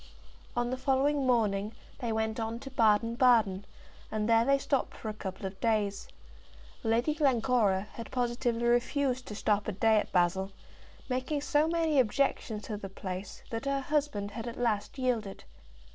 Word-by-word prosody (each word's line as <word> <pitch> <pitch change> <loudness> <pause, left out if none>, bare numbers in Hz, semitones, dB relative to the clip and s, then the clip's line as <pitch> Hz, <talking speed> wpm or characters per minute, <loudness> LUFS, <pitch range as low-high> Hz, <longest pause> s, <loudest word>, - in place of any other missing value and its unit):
"] - - -21
On 240 0 0
the 255 - -1
following 275 +1 +2
morning 210 -3 +1 0.3
they 235 -2 -2
went 220 0 -1
on 225 +1 -2
to 270 - -8
Baden 230 -1 +3
Baden, 225 -6 +3 0.5
and 215 -1 -1
there 230 0 +5
they 275 +3 +4
stopped 275 -1 -1
for 220 - -5
a - - -3
couple 195 -1 -6
of 190 0 -6
days. 210 -3 0 0.8
Lady 235 +7 +2
Glencora 245 - +2
had 230 - -8
positively 240 -1 -1
refused 255 +2 +1
to 210 - -6
stop 205 0 0
a - - 0
day 220 +3 +3
at - - -4
Basle, 185 +2 +2 0.6
making 260 +3 -1
so 295 +2 +2
many 325 -3 +2
objections 235 -3 0
to 215 - -4
the 195 -1 -7
place 185 0 -7
that 225 +3 -3
her 275 0 0
husband 280 -8 -1
had 225 +3 -6
at 235 - -6
last 215 -1 -1
yielded. 235 -6 -1
230 Hz, 170 wpm, -30 LUFS, 210-260 Hz, 0.8 s, there